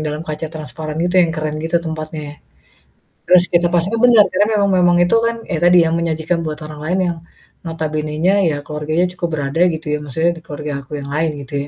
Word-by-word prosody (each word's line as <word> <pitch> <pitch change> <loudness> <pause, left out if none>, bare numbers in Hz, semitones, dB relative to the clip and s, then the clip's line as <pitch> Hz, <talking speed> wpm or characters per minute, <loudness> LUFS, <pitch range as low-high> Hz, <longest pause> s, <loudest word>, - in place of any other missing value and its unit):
dalam 150 +1 -4
kaca 155 0 -4
transparan 155 0 -6
gitu 180 +1 0
yang 170 - +1
keren 155 -1 -3
gitu 165 +2 0
tempatnya. 155 -2 -6 0.9
Terus 180 0 +6
kita 175 0 +3
pastikan 185 +6 0
bener 235 -4 +7
karena 200 +3 +3
memang 200 -1 +2
memang 175 -1 +4
itu 175 - +2
kan 230 0 -2
ya 170 - -1
tadi 175 -1 +6
yang 160 - 0
menyajikan 165 0 -1
buat 155 -1 -3
orang 150 -1 -10
lain 180 +4 0
yang - - -9 0.5
notabenenya 155 +2 -1
ya 155 -3 +1
keluarganya 150 +3 -1
cukup 175 -1 -3
berada 145 +2 -2
gitu 160 -2 -4
ya, - - -1
maksudnya 160 +4 0
di - - -16
keluarga 150 0 -6
aku 145 +3 -7
yang 140 0 -8
lain 160 +2 0
gitu 135 - -12
160 Hz, 200 wpm, -18 LUFS, 150-175 Hz, 0.9 s, bener